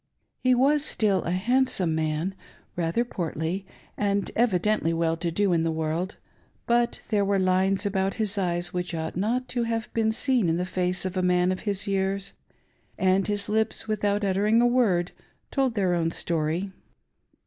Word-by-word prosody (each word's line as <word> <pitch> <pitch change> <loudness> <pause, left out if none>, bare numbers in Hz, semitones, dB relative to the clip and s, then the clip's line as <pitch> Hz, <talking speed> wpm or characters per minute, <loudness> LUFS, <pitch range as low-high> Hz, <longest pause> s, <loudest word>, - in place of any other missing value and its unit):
He 255 0 +3
was 285 +4 +3
still 205 - +1
a - - -2
handsome 195 -2 +1
man, 155 +3 -1 0.4
rather 175 +7 0
portly, 175 -1 -3 0.3
and 200 -1 0
evidently 210 -5 +2
well 165 0 +1
to 170 +1 -2
do 190 +2 +1
in 165 - +2
the 165 - 0
world; 160 +4 -2 0.5
but 235 0 +1
there 205 -2 +3
were 200 0 +1
lines 190 +2 +2
about 195 -1 0
his 215 -2 0
eyes 175 -2 -1
which 180 -1 -3
ought 160 0 -4
not 230 +7 -1
to 245 - -1
have 225 -1 -3
been 220 -1 +2
seen 240 -4 +1
in 165 - +1
the 180 - -1
face 180 0 -1
of 185 0 -3
a - - +2
man 180 0 +2
of 185 - -2
his 200 -1 0
years; 195 0 -1 0.6
and 190 +1 +2
his 205 -1 -1
lips, 220 +1 0
without 205 -1 0
uttering 205 +3 +2
a 240 - +4
word, 220 -8 +2 0.4
told 265 -4 +1
theii 185 -4 +1
own 165 -1 +1
story. 165 +3 -2
190 Hz, 170 wpm, -26 LUFS, 175-215 Hz, 0.6 s, a